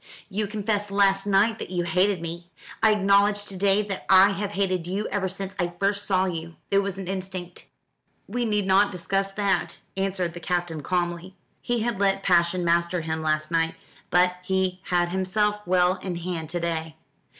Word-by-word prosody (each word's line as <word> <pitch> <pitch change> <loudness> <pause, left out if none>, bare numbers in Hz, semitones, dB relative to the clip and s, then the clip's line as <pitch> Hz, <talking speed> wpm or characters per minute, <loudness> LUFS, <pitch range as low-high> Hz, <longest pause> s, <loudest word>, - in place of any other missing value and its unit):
You 210 +1 -2
confessed 205 0 -2
last 195 0 +2
night 205 +3 +3
that - - -6
you 180 -1 -1
hated 180 +1 +1
me. 170 +1 -6 0.3
I 220 -1 +5
acknowledge 205 0 +3
to 195 - -7
day 200 +2 +2
that 200 -2 -6
I 190 +1 +8
have 200 +1 -3
hated 185 -3 -1
you 195 +4 -2
ever 195 -2 -1
since 195 +1 -5
I 175 -1 -1
first 200 +1 0
saw 190 -1 +2
you. 165 -2 -5 0.2
It 200 - +5
was 200 -1 -2
an 190 -2 -6
instinct." 185 -2 -6 0.6
"We 240 +4 -2
need 210 -3 0
not 195 +1 +4
discuss 195 +2 -1
that," 200 -1 -1
answered 190 -3 -1
the 175 - -7
Captain 175 -2 -2
calmly. 175 +2 -2 0.3
He 240 -1 -1
had 230 -3 -1
let 195 -1 +1
passion 175 0 +3
master 170 +1 +1
him 160 0 -3
last 155 0 -1
night, 165 -1 +1 0.3
but 180 0 +3
he 185 0 -1
had 175 -1 +1
himself 205 +3 0
well 180 0 +3
in 185 -2 -5
hand 170 -2 -4
to 175 - -2
day. 160 -2 -3
190 Hz, 185 wpm, -25 LUFS, 175-200 Hz, 0.6 s, I